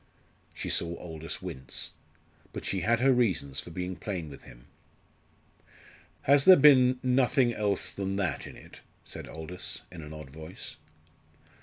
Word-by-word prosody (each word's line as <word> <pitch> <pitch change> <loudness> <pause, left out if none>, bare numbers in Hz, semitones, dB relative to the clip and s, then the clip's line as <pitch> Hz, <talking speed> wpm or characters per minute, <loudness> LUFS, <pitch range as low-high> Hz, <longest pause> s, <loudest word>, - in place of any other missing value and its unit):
She - - -4
saw 85 0 0
Aldous 80 -1 -6
wince; 65 -1 -5 0.6
but - - -6
she 95 - -1
had 115 +1 +2
her 135 0 +5
reasons 90 - +1
for - - -7
being 90 +2 -4
plain 90 -5 -5
with 70 - -11
him. - - -15 1.6
"Has 140 0 +5
there 190 - +11
been 130 -4 +6
nothing 125 -1 +3
else 105 -2 -1
than 95 -1 -3
that 95 -7 -1
in - - -10
it?" - - -14 0.2
said - - -8
Aldous, 80 +3 -6
in 85 -2 -9
an 75 0 -9
odd 75 -3 -9
voice. 80 +4 -9
95 Hz, 150 wpm, -29 LUFS, 80-125 Hz, 1.6 s, there